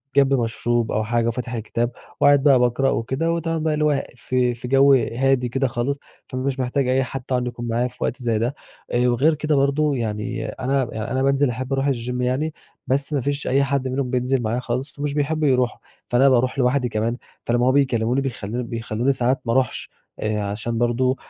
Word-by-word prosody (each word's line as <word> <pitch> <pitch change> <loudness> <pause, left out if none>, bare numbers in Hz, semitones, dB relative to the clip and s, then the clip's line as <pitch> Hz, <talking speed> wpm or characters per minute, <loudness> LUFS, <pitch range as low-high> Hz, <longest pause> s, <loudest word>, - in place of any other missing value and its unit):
جنبي 140 -1 +5
مشروب 120 -1 0
أو 110 - 0
حاجة 115 +1 0
وفاتح 125 +1 -3
الكتاب، 115 +1 -2 0.3
وقاعد 145 -1 +5
بقى 140 -3 +6
باقرأ 125 +2 +2
وكده 135 +9 -1
وتمام 165 -1 -1
بقى 160 -1 +1
اللي 150 0 +1
هو 145 -2 +2
في 125 0 0
في 120 +1 -7
جوّ 135 +2 +5
هادي 125 +1 +2
كده 135 +3 0
خالص، 130 +3 -2 0.3
فمش 130 +1 -3
محتاج 130 +1 0
أي 130 +1 +2
حد 135 +1 -5
طبعًا 125 -1 0
يكون 120 -1 -5
معايا 120 +2 0
في 125 - -14
وقت 130 - -2
زي 115 -3 0
ده، 120 +5 -1 0.4
آآ، 125 +1 +2
وغير 135 +7 +3
كده 155 0 0
برضه 140 +1 +2
يعني 110 -2 -3
أنا 130 +1 -1
يعني 110 0 -4
أنا 130 +1 0
بانزل 140 0 +3
أحب 130 +3 -3
أروح 135 +1 +1
الgym 125 -1 -3
يعني، 130 +5 0 0.3
بس 140 +3 0
مافيش 140 +1 -1
أي 140 +2 +3
حد 140 -1 0
منهم 130 0 -2
بينزل 125 +1 0
معايا 115 +2 -1
خالص 130 +2 -3
فمش 145 0 -3
بيحبّوا 150 +1 0
يروحوا، 125 -2 +1 0.3
فأنا 130 +3 +5
باروح 130 +1 +2
لوحدي 125 0 +2
كمان، 115 +2 -1 0.3
فلما 120 +1 +2
هُم - - +5
بيكلّموني 130 -2 +2
بيخلّو 125 -3 -3
بيخلّوني 115 +2 -1
ساعات 130 0 0
ما 115 - 0
أروحش 130 0 0 0.3
آآ، 105 -1 -1
عشان 110 +3 -3
برضه 120 +2 +1
130 Hz, 195 wpm, -22 LUFS, 120-140 Hz, 0.4 s, بقى